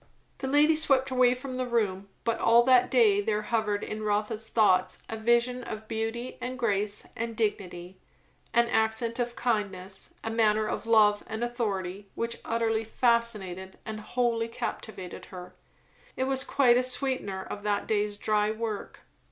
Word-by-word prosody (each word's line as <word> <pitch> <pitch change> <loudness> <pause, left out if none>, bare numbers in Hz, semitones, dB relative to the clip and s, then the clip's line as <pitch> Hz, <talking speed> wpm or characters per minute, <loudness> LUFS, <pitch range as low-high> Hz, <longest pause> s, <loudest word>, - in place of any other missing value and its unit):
The 265 - -3
lady 295 +3 +5
swept 270 -4 +3
away 250 -1 +4
from 255 0 -6
the 255 -1 -2
room; 200 -5 -1
but 230 -1 0
all 235 +1 +5
that 250 0 +5
day 215 -5 +4
there 210 0 -1
hovered 210 -2 0
in 215 0 -5
Rotha's 215 +1 -1
thoughts 185 -5 +2
a 225 - -4
vision 235 +2 +1
of 220 -1 -7
beauty 225 +3 -4
and 255 +1 -4
grace 210 -4 -1
and 230 -1 -4
dignity, 185 -4 -3 0.5
an 235 0 +3
accent 225 +1 0
of 240 0 -2
kindness, 195 -5 -3
a 225 - -3
manner 215 -1 +2
of 225 - -4
love 210 -2 +5
and 220 +1 -4
authority, 200 -5 -3
which 230 0 -2
utterly 225 -1 0
fascinated 215 -6 0
and 215 0 -5
wholly 230 +1 0
captivated 215 -4 -6
her. 180 -1 -10 0.6
It - - +1
was 265 0 +1
quite 245 -4 +4
a - - +4
sweetener 255 -6 -1
of 205 - -7
that 205 -1 -1
day's 210 -1 0
dry 210 0 +1
work. 220 -1 -4
225 Hz, 160 wpm, -28 LUFS, 210-240 Hz, 0.6 s, lady